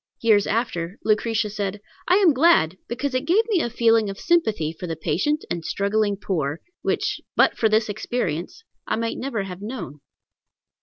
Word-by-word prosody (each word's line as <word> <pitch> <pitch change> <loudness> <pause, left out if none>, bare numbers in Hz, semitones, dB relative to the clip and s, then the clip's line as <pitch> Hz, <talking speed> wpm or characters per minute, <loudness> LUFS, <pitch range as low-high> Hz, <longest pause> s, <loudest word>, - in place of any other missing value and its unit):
Years 215 -3 +3
after 195 -5 -2
Lucretia 215 0 +1
said, 205 -1 -3 0.3
"I 360 - +5
am 380 -6 +5
glad, 255 - +4
because 270 +3 -3
it 255 +2 -1
gave 390 +7 +4
me 385 -6 +2
a 240 - -1
feeling 225 -2 +3
of 195 - -6
sympathy 220 - +1
for 180 +2 -7
the 165 - -3
patient 195 - -1
and 170 -1 -2
struggling 200 +2 0
poor, 160 -6 -2 0.2
which, - - -1
but - - +4
for 220 - +2
this 215 +1 +2
experience, 205 - -3 0.2
I - - 0
might 230 0 -2
never 245 -6 -2
have 185 -1 -8
known." 210 - -7
215 Hz, 170 wpm, -23 LUFS, 185-245 Hz, 0.3 s, I